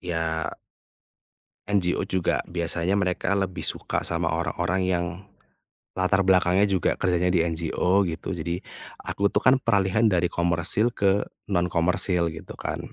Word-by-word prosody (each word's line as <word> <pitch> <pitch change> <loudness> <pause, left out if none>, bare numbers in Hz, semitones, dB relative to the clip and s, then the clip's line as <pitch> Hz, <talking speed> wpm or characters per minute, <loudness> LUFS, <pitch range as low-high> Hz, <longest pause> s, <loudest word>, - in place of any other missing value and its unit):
ya 80 -2 -2 1.2
NGO 95 -4 +1
juga 95 -2 0
biasanya 85 +2 -1
mereka 95 0 0
lebih 95 -3 -2
suka - - -2
sama - - 0
orang-orang 95 +2 -1
yang, 85 -1 0 0.9
latar 95 +1 +2
belakangnya 90 0 +4
juga 95 -3 +1
kerjanya 90 -1 +1
di 85 -3 +3
NGO 85 +3 +1
gitu 85 +3 -5
jadi 85 0 -3 0.4
aku 100 - 0
tuh - - -1
kan 130 +1 +5
peralihan 110 -2 +2
dari 90 -4 +1
komersil 85 +7 0
ke 100 0 +2 0.2
non-komersil 90 -1 +1
gitu 80 - -9
kan - - -4
90 Hz, 130 wpm, -25 LUFS, 85-95 Hz, 1.2 s, kan